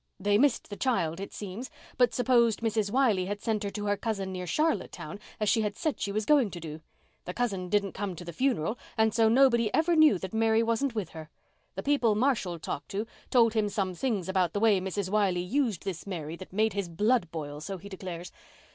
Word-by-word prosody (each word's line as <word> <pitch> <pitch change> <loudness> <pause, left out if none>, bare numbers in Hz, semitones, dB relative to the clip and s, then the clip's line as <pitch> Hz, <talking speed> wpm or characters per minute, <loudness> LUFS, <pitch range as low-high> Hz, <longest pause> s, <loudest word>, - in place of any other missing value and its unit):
They 205 +2 +2
missed 280 -4 +2
the - - -4
child, 185 -10 0
it 195 - -6
seems, 210 +5 -6 0.3
but 245 -2 +4
supposed 235 -2 +3
Mrs. 220 -2 0
Wiley 225 -6 +2
had 205 +1 -3
sent 215 -1 -1
her 200 - -2
to 205 +1 -5
her 205 0 +2
cousin 195 -4 -3
near 180 -1 -5
Charlottetown 200 - -1 0.2
as 215 - 0
she 225 - +3
had 210 0 -2
said 310 -4 -1
she 200 - -1
was 215 +1 -1
going 285 -7 +4
to 175 - -7
do. 155 -1 -7 0.4
The 180 - -6
cousin 195 -7 -1
didn't 200 -1 +1
come 195 -2 -4
to 175 - -9
the 170 - -7
funeral 235 - 0 0.2
and 220 -1 +3
so 225 -1 +4
nobody 235 -3 +4
ever 335 +2 +3
knew 310 - +6
that 190 +2 -7
Mary 225 0 +3
wasn't 230 +3 0
with 200 -6 -2
her. 160 -1 -10 0.5
The 195 - -4
people 255 -7 +2
Marshall 215 -7 +1
talked 155 -2 -5
to 205 +3 -2 0.2
told 230 -3 +4
him 215 -2 +1
some 195 -2 -1
things 205 -2 -2
about 185 -3 +1
the 205 - 0
way 210 -3 +4
Mrs. 190 0 -3
Wiley 195 -4 +2
used 230 - 0
this 190 -1 -5
Mary 165 -4 -4
that 185 - -11
made 215 +2 +1
his 200 -3 -3
blood 205 +2 +1
boil, 150 -2 -6
so 195 +4 -5
he 190 +3 -11
declares. 180 -3 -7
205 Hz, 220 wpm, -29 LUFS, 185-230 Hz, 0.5 s, knew